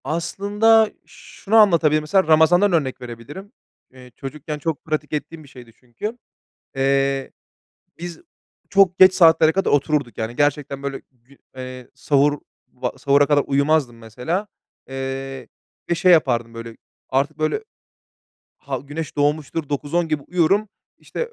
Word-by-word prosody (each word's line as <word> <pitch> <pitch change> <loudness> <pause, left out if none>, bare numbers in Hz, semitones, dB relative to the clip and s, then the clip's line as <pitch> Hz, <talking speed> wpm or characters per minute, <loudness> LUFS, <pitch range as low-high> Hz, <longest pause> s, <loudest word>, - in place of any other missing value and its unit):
Aslında 205 +7 +2
şunu 210 +3 -6
anlatabilirim: 165 -8 +5
Mesela 190 +5 +2
Ramazan'dan 170 +5 +4
örnek 135 -6 -1
verebilirim. 125 - -10 0.4
Eee, 125 -1 -15
çocukken 150 +2 -7
çok 160 0 -4
pratik 155 -1 -3
ettiğim 155 +1 -5
bir 140 - -17
şeydi 125 -4 -14
çünkü. 130 - -7 0.6
Eee, 135 0 0 0.7
biz 175 0 -7 0.5
çok 195 -2 +3
geç 185 0 +7
saatlere 160 -3 +5
kadar 195 +2 0
otururduk, 145 -5 0
yani, 110 +2 -4
gerçekten 145 -1 -1
böyle, 140 -1 -5
gü 125 +2 -24 0.2
eee, 130 -1 -8
sahur 145 0 +1 0.3
va 125 -1 -4
sahura 140 +2 +3
kadar 145 -1 +3
uyumazdım 140 -3 +1
mesela. 125 - -4 0.4
Eee, 135 -1 -6 0.4
ve - - +3
şey 180 +2 +4
yapardım, 120 -8 +2
böyle, 115 0 -9 0.3
artık, 140 +3 -1
böyle, 155 - -1 1.0
ha - - -5
güneş 145 +2 -7
doğmuştur, 150 +1 -1
9-10 150 +4 -1
gibi 155 -3 -2
uyurum. 185 +4 +1 0.3
İşte, - - -10
145 Hz, 130 wpm, -21 LUFS, 135-165 Hz, 1.0 s, geç